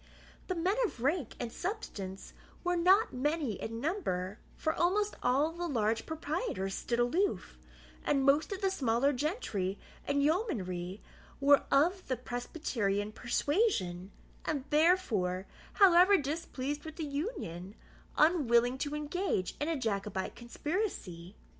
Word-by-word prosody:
The 370 - -1
men 360 +4 +1
of 245 - -3
rank 290 -2 0
and 240 -2 -3
substance 200 - -5 0.3
were 355 0 +1
not 375 +5 +4
many 290 -3 -1
in 225 +1 -4
number; 220 - -2 0.2
for 315 - -1
almost 405 +5 +1
all 275 +6 +2
the 345 +1 -4
large 225 -5 0
proprietors 310 - -2
stood 235 - -2
aloof, 325 +12 0 0.4
and 275 -2 +2
most 290 +4 +4
of 395 +1 -4
the 385 -1 +2
smaller 270 -4 +2
gentry 245 - -2 0.3
and 285 0 +2
yeomanry 205 - -1 0.4
were 280 +1 +5
of 345 +7 +2
the 255 - -1
Presbyterian 240 -5 -2
persuasion, 235 - 0 0.3
and 285 -4 -2
therefore, 240 - +2 0.3
however 380 0 +7
displeased 290 -2 -3
with 315 -1 -8
the 325 - -3
Union, 280 - -4 0.4
unwilling 260 -6 +4
to 290 +2 -2
engage 300 - -1
in 295 - 0
a 325 - 0
Jacobite 200 -5 -2
conspiracy. 235 - -4
285 Hz, 130 wpm, -32 LUFS, 220-345 Hz, 0.4 s, however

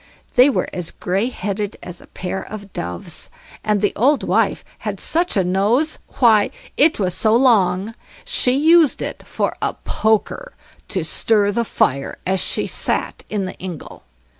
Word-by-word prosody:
They 250 +3 +6
were - - 0
as 180 -2 -3
grey 195 +6 -1
headed 205 -3 -4
as 175 -1 -9
a - - -16
pair 185 +1 -5
of 200 -2 -9
doves, 85 0 -5 0.3
and 210 -2 +1
the 205 - +1
old 275 +6 +3
wife - - +1
had - - -4
such 340 - 0
a 190 - +3
nose! 210 - +1 0.2
why, 220 -5 +5 0.3
it 310 - +3
was 185 -3 0
so 215 +4 +2
long 220 -4 +3 0.3
she 250 - +2
used 320 0 +4
it - - -5
for - - -2
a - - -1
poker 220 - -1 0.3
to 185 -4 -2
stir 205 +5 +2
the 235 +3 0
fire 140 - 0
as 190 +1 +1
she - - -1
sat - - -2
in 205 -3 -2
the 185 - -5
ingle. 180 -5 -8
210 Hz, 165 wpm, -20 LUFS, 185-245 Hz, 0.3 s, They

